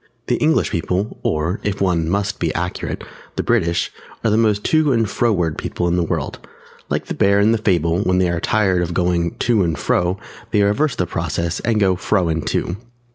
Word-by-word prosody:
_] - - -40 0.2
The - - +1
English - - +2
People, 90 +5 -2
or 80 +5 -1
(if 105 -1 -2
one 85 -4 +1
must 100 +2 -1
be 85 -2 0
accurate) 90 +1 -3 0.3
the - - -1
British, 85 -8 +1 0.3
are 110 - +2
the - - +3
most 110 -2 +2
to 155 -2 +3
and 115 -3 +2
fro 120 +3 +1
ward 85 -6 0
people 85 - -2
in 85 - +1
the 90 - +2
world; 85 - -2 0.5
like - - -1
the - - -4
bear 100 0 +3
in 105 +2 +4
the 115 - +2
fable 85 -5 +1
when 90 -2 +1
they 90 -1 +2
are 85 - -1
tired 95 -2 +2
of 85 0 -3
going 85 -2 +1
to 115 -4 +2
and 85 -4 0
fro 90 +5 +1 0.3
they 105 - +3
reverse 125 +8 +1
the 90 - 0
process 85 0 -2
and 115 -1 0
go 95 -3 +3
fro 90 -1 +1
and 80 -1 -2
to. 85 - -1
90 Hz, 215 wpm, -20 LUFS, 85-105 Hz, 0.5 s, in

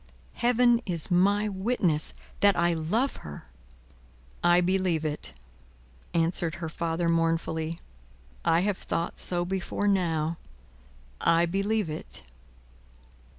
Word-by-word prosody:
Heaven 240 0 +3
is 170 0 -2
my 200 +4 +3
witness 190 -6 0 0.2
that 200 -2 +5
I 170 0 +2
love 195 - 0
her!" 75 -1 -9 1.0
"I 175 0 +5
believe 180 -3 +1
it," 150 - -3 0.8
answered 165 0 +1
her 170 -2 -5
father, 165 +1 -2
mournfully. 165 -1 0 0.6
"I 165 - +3
have 200 0 -1
thought 170 - -3
so 175 -1 +2
before 190 +2 -2
now. 165 -4 +1 0.8
I 170 0 +4
believe 200 +3 0
it." 155 0 -7
175 Hz, 110 wpm, -27 LUFS, 165-195 Hz, 1.0 s, that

